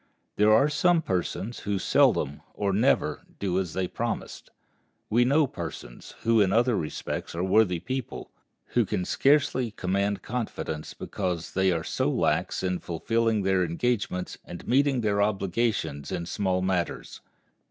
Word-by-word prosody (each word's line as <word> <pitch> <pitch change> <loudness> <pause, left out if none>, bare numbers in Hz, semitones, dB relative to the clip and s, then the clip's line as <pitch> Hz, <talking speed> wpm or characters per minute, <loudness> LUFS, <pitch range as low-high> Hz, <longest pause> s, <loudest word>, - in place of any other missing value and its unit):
There 105 +1 +4
are 135 +7 +6
some 165 +3 +2
persons 95 - -2
who 100 -1 -2
seldom, 75 -5 +2
or 100 -2 0
never, 105 - +2 0.2
do 95 -2 0
as 90 -4 -3
they 95 -1 0
promised. - - -4 0.6
We 120 +3 +4
know 145 +4 +4
persons, - - -8
who 115 -1 +4
in 95 -2 +3
other 120 +2 +3
respects 80 -1 -4
are 85 - -1
worthy 95 -2 +3
people, 130 +5 -5 0.4
who - - +3
can 90 - -2
scarcely 135 -2 +2
command 100 0 -1
confidence, 105 -10 -4
because 90 -4 -3
they 95 0 +3
are 80 -2 -1
so - - 0
slack - - +1
in 90 -1 0
fulfilling 110 +5 0
their 95 -1 +2
engagements 90 +1 -2
and 85 - -10
meeting 135 0 +3
their 100 -2 +1
obligations 100 - -1
in 85 - -3
small 95 0 -1
matters. 95 -2 -2
100 Hz, 145 wpm, -27 LUFS, 90-115 Hz, 0.6 s, are